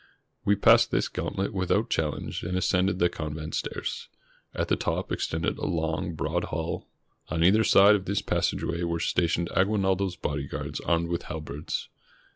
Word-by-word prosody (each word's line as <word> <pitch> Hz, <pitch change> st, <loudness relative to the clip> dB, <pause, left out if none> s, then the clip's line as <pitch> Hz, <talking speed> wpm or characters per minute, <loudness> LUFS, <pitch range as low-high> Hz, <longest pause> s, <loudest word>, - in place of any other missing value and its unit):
We 100 Hz, -, +3 dB
passed 100 Hz, -, +6 dB
this -, -, +1 dB
gantlet 95 Hz, +1 st, -3 dB
without 95 Hz, -2 st, 0 dB
challenge -, -, -2 dB
and 90 Hz, +1 st, -2 dB
as 95 Hz, -, +1 dB
cended 90 Hz, 0 st, +2 dB
the 85 Hz, -, +4 dB
convent 75 Hz, -2 st, -5 dB
stairs. -, -, -3 dB, 0.4 s
At -, -, -2 dB
the -, -, +2 dB
top -, -, -2 dB
extended 80 Hz, 0 st, -1 dB
a -, -, -2 dB
long, 80 Hz, 0 st, -1 dB
broad -, -, -1 dB
hall. 80 Hz, +1 st, -4 dB, 0.4 s
On 85 Hz, -1 st, 0 dB
either 105 Hz, +5 st, +5 dB
side 100 Hz, -1 st, +7 dB
of 100 Hz, -2 st, 0 dB
this 100 Hz, +1 st, -1 dB
passageway 85 Hz, 0 st, -1 dB
were 85 Hz, -1 st, -1 dB
stationed 85 Hz, 0 st, 0 dB
Aguinaldo's 95 Hz, -1 st, +1 dB
bodyguards 70 Hz, -4 st, -4 dB
armed 85 Hz, 0 st, 0 dB
with 85 Hz, 0 st, -2 dB
halberds. 75 Hz, -3 st, -4 dB
85 Hz, 160 wpm, -27 LUFS, 80-95 Hz, 0.4 s, side